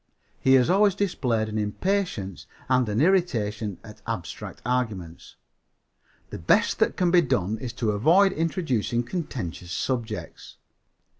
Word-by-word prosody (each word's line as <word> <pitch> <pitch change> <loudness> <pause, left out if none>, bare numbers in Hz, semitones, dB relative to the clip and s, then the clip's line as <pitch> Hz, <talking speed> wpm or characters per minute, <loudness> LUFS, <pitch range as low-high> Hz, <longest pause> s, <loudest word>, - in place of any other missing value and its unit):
He 130 - +4
has 125 -2 +4
always 200 +1 +4
displayed 125 - 0
an 110 0 -3
impatience 105 - -2 0.2
and 125 -3 +2
an 105 +2 0
irritation 115 - +1
at 105 0 -13
abstract 115 -7 -5
arguments. 110 -9 -3 1.0
The - - -6
best - - +2
that - - +2
can 180 -2 +2
be 175 -1 +6
done 105 - -1
is 120 0 -5
to 115 -3 0
avoid 170 - +4
introducing 150 - -1
contentious 115 - -5
subjects. 115 0 -4
120 Hz, 130 wpm, -25 LUFS, 105-170 Hz, 1.0 s, be